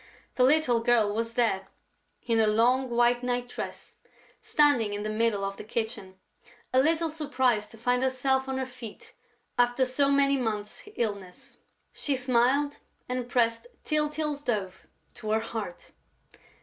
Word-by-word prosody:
The 250 - +2
little 260 -3 +4
girl 230 -3 +2
was 230 +1 -3
there, 205 -6 +1 0.6
in 230 -2 +2
her 220 - +4
long 245 +5 +3
white 240 0 +3
night 245 0 -1
dress, - - -7 0.4
standing 280 -9 +3
in 205 - -4
the 215 - -2
middle 215 -2 +1
of 195 0 -4
the - - -7
kitchen, 220 -4 -4 0.6
a 260 - +5
little 325 +2 +1
surprised 260 -8 0
to 225 - -13
find 245 +2 +1
herself 265 0 +1
on 265 - -2
her 260 - -1
feet 255 - -11 0.5
after 245 +2 +3
so 275 +2 +2
many 280 0 +3
months' 220 - -4
illness. 200 - -5 0.3
She 285 - -1
smiled 260 +3 +1 0.3
and 250 -1 -3
pressed 230 -1 +1 0.2
Tyltyl's 300 -1 -1
dove 200 -8 -3 0.3
to 215 - -7
her 220 +1 +3
heart. 220 -5 -6
245 Hz, 150 wpm, -28 LUFS, 220-265 Hz, 0.6 s, a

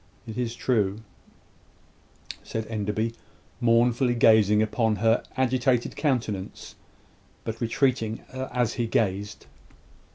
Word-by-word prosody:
"It 110 -2 -7
is 120 -2 -2
true," 105 -5 0 1.4
said 110 0 -4
Enderby, 110 +1 -2 0.5
mournfully 120 +1 +3
gazing 110 -2 +5
upon 110 0 +1
her 115 +3 +2 0.2
agitated 130 -1 +1
countenance, 115 -10 -2 0.7
but 115 +2 -5
retreating 115 -2 0
as 125 -3 -1
he 120 -2 -1
gazed. 105 -2 -1
115 Hz, 95 wpm, -26 LUFS, 110-125 Hz, 1.4 s, gazing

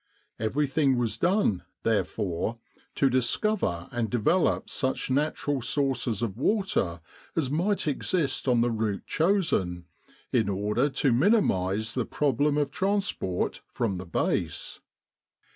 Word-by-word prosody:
Everything 135 +4 +1
was 120 -2 0
done, 175 - +2 0.2
therefore, 105 -1 -1 0.4
to 140 - +3
discover 125 - 0
and 120 -2 -1
develop 125 - +2
such 130 -1 -2
natural 145 0 0
sources 125 -4 0
of 110 -5 -2
water 135 - 0 0.3
as 140 -5 0
might 180 +5 0
exist 150 0 0
on 120 -2 +4
the 120 0 +2
route 110 -3 -2
chosen, 160 - +1 0.5
in 115 -4 +2
order 105 +8 +1
to 135 -1 +1
minimise 110 - +2
the 125 -3 -1
problem 145 +1 +1
of 145 -1 0
trans 200 +3 0
port 90 -1 -3
from 100 -6 -2
the 95 - -7
base. 85 - -2
130 Hz, 125 wpm, -27 LUFS, 105-150 Hz, 0.5 s, on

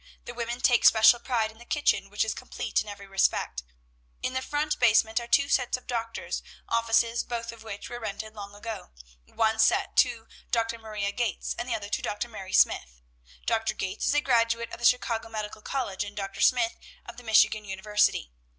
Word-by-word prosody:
The 240 - -7
women 240 +1 -4
take 245 -2 +4
special 225 +2 +7
pride 230 -3 -1
in 220 - -20
the - - -12
kitchen, 290 -7 +1
which 205 +2 0
is 220 - -1
complete - - -2
in 215 - -9
every 200 -1 -8
respect. 195 - 0 0.6
In 255 - -1
the 260 - -1
front 295 +3 -1
basement 220 -1 +4
are 235 - -7
two 280 +4 +4
sets 250 -3 +1
of 250 - -17
doctors' 230 -2 -3 0.3
offices, 230 0 +2
both 230 -1 -4
of 230 -1 -13
which 215 -2 -7
were 240 - -6
rented 215 0 -6
long 205 -1 -9
ago; 210 - -7 0.3
one 220 0 0
set 385 - +3
to 235 -3 +3 0.2
Dr. 230 0 0
Maria 210 -2 -3
Gates, 230 -2 -2
and 240 +1 -5
the - - +1
other 205 -1 -6
to - - -1
Dr. 210 +3 -3
Mary 195 -4 -8
Smith. - - +2 0.5
Dr. 225 0 0
Gates 195 +2 -3
is - - +2
a 295 - +4
graduate 230 -3 +1
of - - -8
the 240 - -2
Chicago 230 -2 +2
Medical 215 -1 -5
College, 210 -6 -2
and 205 0 -9
Dr. 195 0 -4
Smith 240 -2 +3 0.3
of 235 -1 -10
the 245 - -11
Michigan 215 -1 +4
University. 195 - 0
225 Hz, 195 wpm, -27 LUFS, 210-240 Hz, 0.6 s, special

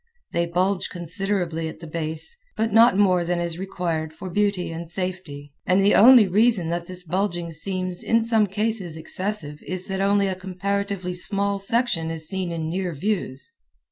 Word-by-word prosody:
They 170 0 0
bulge 185 +2 0
considerably 175 -2 -2
at - - -10
the 170 - -9
base, 160 - -4 0.2
but 220 -1 0
not 225 -3 +6
more 185 -3 +4
than 175 0 -1
is 170 0 -3
required 170 -4 -2
for 180 +3 -7
beauty 200 -3 0
and 165 0 -6
safety 175 -6 -5
and 185 +1 +4
the 200 +1 +4
only 240 -2 +8
reason 205 -2 +3
that 170 0 -3
this 185 0 -6
bulging 175 -1 -2
seems 185 +2 -4
in 230 0 +2
some 225 -2 +2
cases 200 -4 -1
excessive 160 -3 -4
is 185 0 -4
that 190 0 -1
only 200 0 +3
a 190 - 0
comparatively 190 0 -3
small 200 +2 0
section 195 -6 +1
is 160 -1 -2
seen 185 -1 -2
in 165 -1 -3
near 180 0 -2
views. 150 -6 -2
185 Hz, 170 wpm, -24 LUFS, 170-200 Hz, 0.2 s, only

